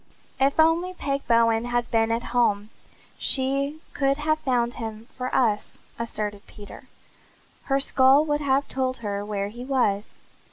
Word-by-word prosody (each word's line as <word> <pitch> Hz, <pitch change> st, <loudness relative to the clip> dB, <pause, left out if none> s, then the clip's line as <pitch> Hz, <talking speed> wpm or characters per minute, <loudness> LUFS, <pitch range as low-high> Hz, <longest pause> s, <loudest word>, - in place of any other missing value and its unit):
"If 275 Hz, +3 st, +2 dB
only 335 Hz, +3 st, +3 dB
Peg 275 Hz, -4 st, -3 dB
Bowen 230 Hz, -1 st, +3 dB
had 240 Hz, 0 st, -1 dB
been 225 Hz, 0 st, +2 dB
at 230 Hz, +1 st, -1 dB
home 215 Hz, -3 st, +1 dB, 0.5 s
she 275 Hz, +3 st, 0 dB
could 275 Hz, 0 st, +1 dB
have 310 Hz, +1 st, 0 dB
found 245 Hz, -4 st, 0 dB
him 220 Hz, 0 st, -6 dB
for 255 Hz, -1 st, -3 dB
us," 220 Hz, -5 st, +1 dB, 0.2 s
asserted 210 Hz, -3 st, -4 dB
Peter. 205 Hz, -1 st, -12 dB, 0.8 s
"Her 275 Hz, 0 st, +1 dB
skull 270 Hz, +2 st, +4 dB
would 295 Hz, -1 st, 0 dB
have 280 Hz, 0 st, +1 dB
told 260 Hz, -1 st, -2 dB
her 200 Hz, 0 st, -2 dB
where 205 Hz, -1 st, -3 dB
he 240 Hz, +4 st, -9 dB
was." 240 Hz, -6 st, 0 dB
250 Hz, 150 wpm, -25 LUFS, 225-275 Hz, 0.8 s, skull